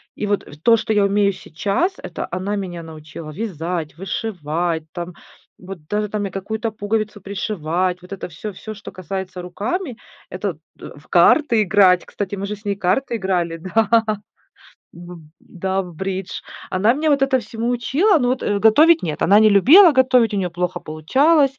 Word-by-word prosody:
И -, -, -3 dB
вот 205 Hz, 0 st, -1 dB, 0.2 s
то, 230 Hz, -1 st, +6 dB
что 220 Hz, 0 st, -1 dB
я 205 Hz, -1 st, +3 dB
умею 200 Hz, 0 st, +2 dB
сейчас, 200 Hz, -, -2 dB
это 170 Hz, -, -6 dB
она 185 Hz, +4 st, -2 dB
меня 180 Hz, -4 st, -5 dB
научила 155 Hz, 0 st, -10 dB
вязать, 170 Hz, -4 st, -4 dB
вышивать, 170 Hz, -4 st, -3 dB
там 175 Hz, 0 st, -6 dB, 0.4 s
вот 185 Hz, -4 st, -10 dB
даже 210 Hz, +3 st, -1 dB
там 210 Hz, 0 st, -2 dB
я 195 Hz, -, -5 dB
какую-то 220 Hz, +4 st, -3 dB
пуговицу 215 Hz, 0 st, -2 dB
пришивать. 180 Hz, -2 st, -2 dB
Вот 180 Hz, +2 st, -10 dB
это 195 Hz, -, -6 dB
всё, 190 Hz, +6 st, -7 dB
всё, 215 Hz, +4 st, -8 dB
что 205 Hz, -1 st, -10 dB
касается 185 Hz, 0 st, -6 dB
руками, 235 Hz, -, -4 dB, 0.3 s
это -, -, -3 dB, 0.2 s
т -, -, -10 dB
в -, -, -18 dB
карты 240 Hz, -8 st, +4 dB
играть. 185 Hz, -2 st, +4 dB
Кстати, 200 Hz, 0 st, -5 dB
мы 200 Hz, +1 st, -4 dB
же 210 Hz, -, -4 dB
с 210 Hz, -, -20 dB
ней 200 Hz, -1 st, 0 dB
карты 200 Hz, +7 st, 0 dB
играли, 180 Hz, -4 st, -1 dB
да, 220 Hz, +6 st, +2 dB, 0.9 s
в 175 Hz, 0 st, -11 dB, 0.2 s
да, 190 Hz, +2 st, -3 dB
в 175 Hz, -2 st, -11 dB
бридж. 190 Hz, +2 st, -4 dB, 0.3 s
Она 205 Hz, +6 st, +3 dB
меня 305 Hz, +2 st, 0 dB
вот 280 Hz, -2 st, +3 dB
этому 265 Hz, -1 st, +2 dB
всему 230 Hz, 0 st, -4 dB
учила. 275 Hz, -, +2 dB
Но 250 Hz, -3 st, 0 dB
вот 255 Hz, +1 st, -1 dB
готовить 225 Hz, +11 st, +4 dB
нет, 155 Hz, -3 st, -3 dB
она 200 Hz, +4 st, +6 dB
не 215 Hz, 0 st, +6 dB
любила 305 Hz, -, +7 dB
готовить, 255 Hz, -4 st, +3 dB
у -, -, 0 dB
нее 180 Hz, -2 st, -1 dB
плохо 180 Hz, +1 st, -3 dB
получалось, 270 Hz, -, +2 dB
200 Hz, 175 wpm, -20 LUFS, 180-225 Hz, 0.9 s, любила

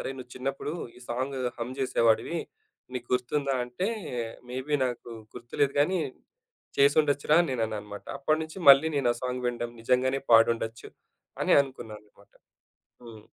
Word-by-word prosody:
"అరే! -, -, -4 dB
నువ్వు 125 Hz, -1 st, -10 dB
చిన్నప్పుడు 135 Hz, +3 st, -3 dB, 0.2 s
ఈ -, -, -13 dB
సాంగ్ 130 Hz, +3 st, -2 dB, 0.2 s
హమ్ 120 Hz, +2 st, -4 dB
జేసేవాడివి. 125 Hz, +4 st, +2 dB, 0.6 s
నీకు 120 Hz, -1 st, -5 dB
గుర్తుందా?" 135 Hz, +2 st, 0 dB
అంటే 125 Hz, +11 st, -3 dB, 0.6 s
మేబీ 130 Hz, +4 st, -2 dB
నాకు 120 Hz, -1 st, -6 dB, 0.3 s
గుర్తులేదు 125 Hz, +3 st, -1 dB
గానీ, 180 Hz, +5 st, +2 dB, 0.8 s
చేసుండొచ్చురా 145 Hz, +1 st, +4 dB
అని 170 Hz, -, -2 dB
నేనన్నా 110 Hz, -3 st, -1 dB
అన్నమాట. 105 Hz, 0 st, -10 dB
అప్పటి 155 Hz, +3 st, +1 dB
నుంచి 160 Hz, +4 st, -10 dB
మళ్ళీ 140 Hz, +3 st, +8 dB
నేను 130 Hz, -4 st, +2 dB
ఆ -, -, -12 dB
సాంగ్ 125 Hz, 0 st, -3 dB
వినడం 120 Hz, -1 st, -3 dB
నిజంగానే 130 Hz, +3 st, +2 dB
పాడుండొచ్చు 115 Hz, 0 st, +3 dB, 0.5 s
అని -, -, +3 dB
అనుకున్నా 130 Hz, -5 st, -9 dB
అన్నమాట. 105 Hz, -1 st, -24 dB, 0.7 s
హ్మ్. 110 Hz, -2 st, -12 dB
125 Hz, 140 wpm, -28 LUFS, 120-140 Hz, 0.8 s, మళ్ళీ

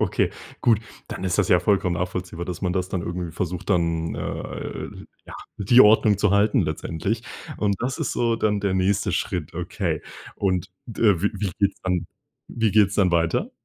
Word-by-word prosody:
.Okay, -, -, +1 dB, 0.3 s
gut. 115 Hz, -3 st, +3 dB, 0.3 s
Dann -, -, -6 dB
ist 90 Hz, 0 st, 0 dB
das 105 Hz, -, +2 dB
ja 90 Hz, -, +5 dB
vollkommen 90 Hz, -1 st, +2 dB
nachvollziehbar, 90 Hz, -1 st, -4 dB
dass 90 Hz, +1 st, -6 dB
man 90 Hz, -, 0 dB
das 90 Hz, 0 st, -1 dB
dann 95 Hz, -2 st, -2 dB
irgendwie 85 Hz, -1 st, -4 dB
versucht, 90 Hz, +3 st, -4 dB
dann, 85 Hz, -3 st, +1 dB
äh -, -, -5 dB, 0.4 s
ja, -, -, -11 dB, 0.2 s
die 120 Hz, +5 st, +5 dB
Ordnung 105 Hz, -2 st, +6 dB
zu 105 Hz, -1 st, +3 dB
halten 100 Hz, +1 st, +3 dB
letztendlich. 85 Hz, +7 st, -2 dB, 0.3 s
Und 100 Hz, -2 st, 0 dB
das 125 Hz, +2 st, -2 dB
ist -, -, -1 dB
so 115 Hz, -1 st, +1 dB
dann 105 Hz, -2 st, +1 dB
der 100 Hz, -1 st, 0 dB
nächste 95 Hz, +1 st, +1 dB
Schritt. 85 Hz, -3 st, -2 dB
Okay. 90 Hz, -2 st, -2 dB, 0.3 s
Und 95 Hz, -1 st, -1 dB, 0.2 s
d 115 Hz, -2 st, -5 dB, 0.2 s
wie 105 Hz, -, +2 dB
wie 100 Hz, -3 st, -2 dB
geht's 100 Hz, -1 st, +1 dB
dann 90 Hz, -2 st, -1 dB, 0.4 s
wie 115 Hz, -3 st, 0 dB
geht's 100 Hz, -2 st, +4 dB
dann 95 Hz, -3 st, +3 dB
dann 85 Hz, -, +4 dB
weiter? 80 Hz, 0 st, -1 dB
95 Hz, 185 wpm, -24 LUFS, 90-105 Hz, 0.4 s, Ordnung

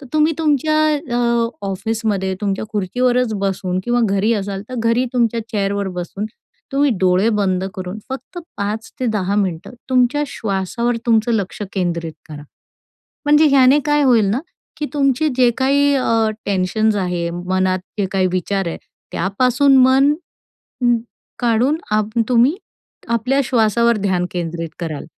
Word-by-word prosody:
तर 275 Hz, -, -11 dB
तुम्ही 310 Hz, +1 st, +3 dB
तुमच्या 310 Hz, 0 st, +2 dB, 0.4 s
अ, 235 Hz, -1 st, +1 dB, 0.2 s
ऑफिसमध्ये 200 Hz, -1 st, -2 dB
तुमच्या 200 Hz, 0 st, -1 dB
खुर्चीवरच 245 Hz, +4 st, +1 dB
बसून 185 Hz, -1 st, -1 dB
किंवा 240 Hz, 0 st, +1 dB
घरी 200 Hz, +3 st, +1 dB
असाल 195 Hz, 0 st, -5 dB
तर 255 Hz, -, -6 dB
घरी 230 Hz, +2 st, +2 dB
तुमच्या 235 Hz, -2 st, +1 dB
चेअरवर 200 Hz, -1 st, -1 dB
बसून 195 Hz, +4 st, -5 dB, 0.5 s
तुम्ही 280 Hz, 0 st, +3 dB
डोळे 185 Hz, +3 st, +3 dB
बंद 190 Hz, -2 st, 0 dB
करून 185 Hz, +2 st, -6 dB
फक्त 265 Hz, +6 st, -7 dB, 0.2 s
5-10 210 Hz, -1 st, -2 dB
मिनिटं 180 Hz, +5 st, -5 dB, 0.2 s
तुमच्या 255 Hz, +3 st, +3 dB
श्वासावर 230 Hz, +1 st, -2 dB
तुमचं 230 Hz, 0 st, +3 dB
लक्ष 205 Hz, -1 st, -2 dB
केंद्रित 170 Hz, -4 st, -2 dB, 0.2 s
करा. 145 Hz, -1 st, -8 dB, 0.8 s
म्हणजे 295 Hz, +1 st, +5 dB
ह्याने 275 Hz, +1 st, +5 dB
काय 295 Hz, 0 st, +3 dB
होईल 240 Hz, -6 st, +4 dB
ना 245 Hz, +6 st, 0 dB, 0.4 s
की 300 Hz, -, -3 dB
तुमचे 275 Hz, +1 st, +2 dB
जे 250 Hz, -2 st, +5 dB
काही 280 Hz, +2 st, +3 dB
अ, 225 Hz, -4 st, +2 dB, 0.2 s
टेन्शन्स 205 Hz, +3 st, +1 dB
आहे, 180 Hz, -3 st, -1 dB
मनात 185 Hz, +2 st, 0 dB, 0.2 s
जे 200 Hz, -, +1 dB
काही 190 Hz, -1 st, +2 dB
विचार 190 Hz, +1 st, -1 dB
आहे, -, -, -5 dB, 0.3 s
त्यापासून 255 Hz, +7 st, +2 dB
मन 270 Hz, +3 st, +4 dB, 0.7 s
उम्म, 240 Hz, -1 st, +3 dB, 0.4 s
काढून 240 Hz, +5 st, +2 dB, 0.2 s
आप 215 Hz, 0 st, +1 dB, 0.2 s
तुम्ही 250 Hz, +5 st, +4 dB, 0.5 s
आपल्या 250 Hz, +4 st, +1 dB
श्वासावर 235 Hz, -1 st, +2 dB
ध्यान 185 Hz, -3 st, 0 dB
केंद्रित 165 Hz, -1 st, -4 dB
कराल. 160 Hz, -4 st, -5 dB
220 Hz, 135 wpm, -19 LUFS, 190-255 Hz, 0.8 s, म्हणजे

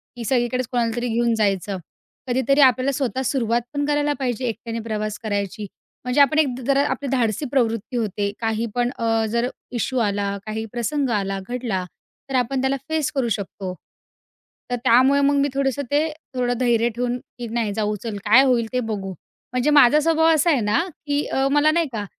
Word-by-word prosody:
की 240 Hz, -, -6 dB
सगळीकडेच 250 Hz, 0 st, 0 dB
कोणालातरी 240 Hz, 0 st, 0 dB
घेऊन 235 Hz, 0 st, +1 dB
जायचं. 200 Hz, -2 st, 0 dB, 0.5 s
कधीतरी 265 Hz, +3 st, +2 dB
आपल्याला 260 Hz, +1 st, +4 dB
स्वतः 265 Hz, -1 st, -2 dB
सुरुवात 235 Hz, -3 st, +1 dB
पण 285 Hz, 0 st, -1 dB
करायला 295 Hz, 0 st, +1 dB
पाहिजे, 250 Hz, -1 st, -2 dB
एकट्याने 230 Hz, 0 st, -4 dB
प्रवास 215 Hz, -2 st, -3 dB
करायची. 205 Hz, 0 st, -3 dB, 0.4 s
म्हणजे 250 Hz, +3 st, +2 dB
आपण 300 Hz, +3 st, +4 dB
एक 300 Hz, -, +4 dB, 0.2 s
जरा 275 Hz, 0 st, +3 dB
आपली 265 Hz, +2 st, -3 dB
धाडसी 245 Hz, +1 st, 0 dB
प्रवृत्ती 235 Hz, -2 st, 0 dB
होते, 205 Hz, -2 st, -1 dB
काही 225 Hz, 0 st, -1 dB
पण 245 Hz, 0 st, +1 dB
अ, 225 Hz, -1 st, +1 dB
जर 235 Hz, +2 st, 0 dB, 0.2 s
इश्यु 250 Hz, +1 st, -1 dB
आला, 200 Hz, -2 st, 0 dB
काही 220 Hz, +1 st, -4 dB
प्रसंग 250 Hz, +3 st, -1 dB
आला, 195 Hz, -3 st, -1 dB
घडला, 235 Hz, -7 st, -2 dB, 0.5 s
तर 270 Hz, -, -2 dB
आपण 255 Hz, +1 st, +1 dB
त्याला 265 Hz, +1 st, +1 dB
फेस 315 Hz, -2 st, 0 dB
करू 255 Hz, -3 st, +1 dB
शकतो. 195 Hz, -3 st, -4 dB, 1.0 s
तर -, -, +2 dB
त्यामुळे 260 Hz, +3 st, +5 dB
मग 285 Hz, +1 st, +3 dB
मी 280 Hz, 0 st, +3 dB
थोडंसं 275 Hz, 0 st, 0 dB
ते 300 Hz, +2 st, +2 dB, 0.3 s
थोडं 245 Hz, -1 st, +1 dB
धैर्य 240 Hz, -2 st, +2 dB
ठेवून 245 Hz, +2 st, -2 dB, 0.2 s
की, 240 Hz, -, -5 dB
"नाही 225 Hz, -2 st, -1 dB
जाऊ 210 Hz, -1 st, 0 dB
चल, 220 Hz, -3 st, -4 dB
काय 240 Hz, +6 st, +7 dB
होईल 235 Hz, -3 st, +2 dB
ते 250 Hz, -, +1 dB
बघू." 205 Hz, -5 st, -4 dB, 0.4 s
म्हणजे 250 Hz, +4 st, +1 dB
माझा 295 Hz, 0 st, +6 dB
स्वभाव 320 Hz, +1 st, +3 dB
असा 315 Hz, +3 st, +2 dB
आहे 280 Hz, -6 st, +3 dB
ना 210 Hz, +5 st, +2 dB, 0.3 s
की 290 Hz, +1 st, +1 dB
अ, 270 Hz, 0 st, 0 dB
मला 295 Hz, +1 st, +4 dB
नाही 335 Hz, -1 st, +1 dB
का 205 Hz, -2 st, -3 dB
245 Hz, 180 wpm, -22 LUFS, 220-270 Hz, 1.0 s, काय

